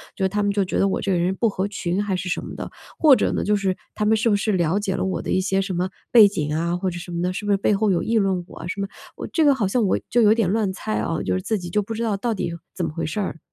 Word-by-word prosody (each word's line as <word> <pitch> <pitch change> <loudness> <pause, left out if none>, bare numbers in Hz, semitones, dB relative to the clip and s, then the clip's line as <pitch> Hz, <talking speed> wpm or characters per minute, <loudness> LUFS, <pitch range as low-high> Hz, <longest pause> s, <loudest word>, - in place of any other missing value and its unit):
就 190 -1 +1
他 205 +2 -1
们 205 - +2
就 200 -1 +1
觉 - - -2
得 - - +3
我 - - -1
这 195 - 0
个 - - +2
人 175 +2 +1
不 230 - +1
合 195 -2 -1
群 195 0 -2
还 195 -2 -1
是 180 - -5
什 180 - -1
么 - - -8
的？ - - -6 0.3
或 295 -5 +7
者 - - +1
呢， - - -1
就 210 0 +3
是 195 -2 0 0.2
他 210 - -2
们 220 +1 +4
是 230 +2 +2
不 205 - +3
是 215 +2 0
了 175 -1 +1
解 195 -2 -2
了 - - -1
我 190 - -2
的 - - -4
一 185 - +2
些 195 +1 +1
什 190 -1 -3
么 180 +1 -1 0.2
背 220 -4 +9
景 150 -6 -2
啊 170 +2 0
或 185 +1 -1
者 175 0 -6
什 175 +1 -9
么 170 0 -2
的， 180 +1 0
是 195 - -5
不 205 - +1
是 200 - +5
背 200 - +2
后 205 +1 +1
有 175 - +1
议 230 0 +1
论 190 -4 +1
我 - - -13
啊 165 - -6
什 200 +2 -4
么？ 195 - -2 0.3
我 - - -6
这 320 - +1
个 280 -2 +5
好 220 -6 0
像 235 +5 +1
我 190 - +2
就 240 - +3
有 215 0 +6
点 225 -6 +1
乱 210 -2 +1
猜 215 +3 -4
啊， 165 - -2
就 90 - -1
是 95 - -1
自 220 - -1
己 175 -2 -7
就 210 +4 +1
不 225 +3 -5
知 230 - -3
道 215 -3 0
到 230 +3 -1
底 170 -4 -3 0.2
怎 - - -1
么 - - -3
回 165 - -3
事 205 +7 -2
儿？ 165 -4 -4
195 Hz, 375 characters per minute, -23 LUFS, 180-210 Hz, 0.3 s, 背